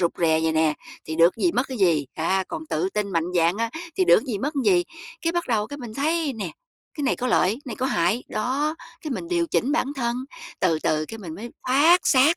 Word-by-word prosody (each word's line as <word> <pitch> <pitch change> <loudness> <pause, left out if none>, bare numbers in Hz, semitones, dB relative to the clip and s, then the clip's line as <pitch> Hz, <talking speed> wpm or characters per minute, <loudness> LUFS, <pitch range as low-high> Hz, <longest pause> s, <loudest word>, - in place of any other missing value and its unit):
rụt 170 -2 +2
rè 160 -2 +3
vậy 160 - +1
nè, 160 -1 +2 0.3
thì 160 - -5
được 170 +2 +5
cái - - -3
gì, 345 - +4
mất 255 -2 0
cái 260 -4 -5
gì, 165 -7 +3
a, 190 +4 0
còn 160 - -6
tự 155 +4 -1
tin 210 -1 -1
mạnh 165 -1 +1
dạn 170 +2 +3
á 230 0 -1 0.3
thì 375 - +3
được - - +6
cái 255 - -3
gì, 205 - -1
mất 290 +8 -2
cái 280 - 0
gì. 175 -1 +3 0.4
Cái 330 - +1
bắt 345 0 0
đầu 215 -3 +1
cái 285 - -7
mình 235 -4 -8
thấy 310 +2 0
nè, 225 -4 -4 0.4
cái 295 - -4
này 265 - +1
có 255 - -2
lợi, 220 -2 +2
này 240 -6 -6
có 260 - -1
hại, 190 0 +1
đó, 275 +8 -1 0.3
cái 310 - -6
mình 335 +6 -4
điều 345 -1 +1
chỉnh 285 -3 0
bản 310 - +1
thân, 235 -2 -1 0.4
từ 165 -4 +2
từ 155 0 0
cái 225 - -8
mình 175 -7 -7
mới 225 +7 -8 0.2
thoát 295 +8 +6
xác, 270 +4 +6
225 Hz, 255 wpm, -24 LUFS, 170-280 Hz, 0.4 s, được